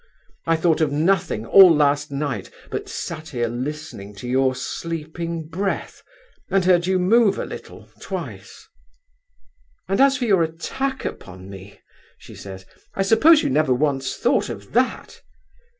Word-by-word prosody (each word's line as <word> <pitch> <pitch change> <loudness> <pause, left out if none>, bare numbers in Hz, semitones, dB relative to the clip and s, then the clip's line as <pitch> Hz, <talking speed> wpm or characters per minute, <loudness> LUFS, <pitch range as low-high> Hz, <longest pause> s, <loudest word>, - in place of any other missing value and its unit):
I 165 - +3
thought 165 0 +1
of 155 -3 +2
nothing 160 - 0
all 190 +7 +8
last 145 0 +2
night, 140 -7 -3 0.2
but - - -4
sat 160 -1 -6
here 120 -4 -1
listening 125 -4 -6
to 110 +5 -8
your 130 +1 +2
sleeping 165 +1 -5
breath, 190 +5 -3 0.5
and 190 -1 +1
heard 180 -1 +3
you 190 0 +2
move 200 +3 +3
a - - -3
little, - - -10
twice.' - - -8 1.2
'And 195 +6 +1
as 275 0 +5
for 255 - -2
your 195 -6 +3
attack 265 +12 -3
upon 95 +1 -8
me,' 95 +1 -12 0.4
she - - -14
says, 95 -1 -10 0.3
'I 195 - +1
suppose 295 +11 +5
you - - 0
never 145 -2 +2
once 135 -1 -1
thought - - +1
of - - -8
_that? - - -1
160 Hz, 150 wpm, -22 LUFS, 130-190 Hz, 1.2 s, all